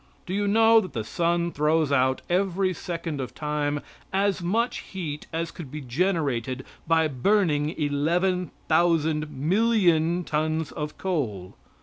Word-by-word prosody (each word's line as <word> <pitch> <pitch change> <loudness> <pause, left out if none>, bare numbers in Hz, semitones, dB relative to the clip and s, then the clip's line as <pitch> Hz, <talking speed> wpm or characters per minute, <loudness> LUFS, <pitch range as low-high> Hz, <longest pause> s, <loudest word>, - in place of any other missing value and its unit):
Do 185 - -5
you 205 +1 0
know 225 +2 +6
that 185 -7 -8
the 115 -4 -2
sun 170 +7 0
throws 150 0 +1
out 130 -1 +2
every 185 +1 +1
second 165 -4 -4
of 130 - -6
time 150 -1 -1 0.3
as 195 0 +1
much 225 +8 0
heat 155 -6 -6
as 165 0 -2
could 160 -6 -9
be 155 - -6
generated 135 -3 -1 0.2
by 160 -1 +3
burning 150 +1 +1
eleven 170 +5 +1 0.2
thousand 160 -2 +2
millions 175 - +2
tons 155 0 -1
of 150 0 -5
coal? 115 - -2
160 Hz, 135 wpm, -26 LUFS, 145-185 Hz, 0.3 s, know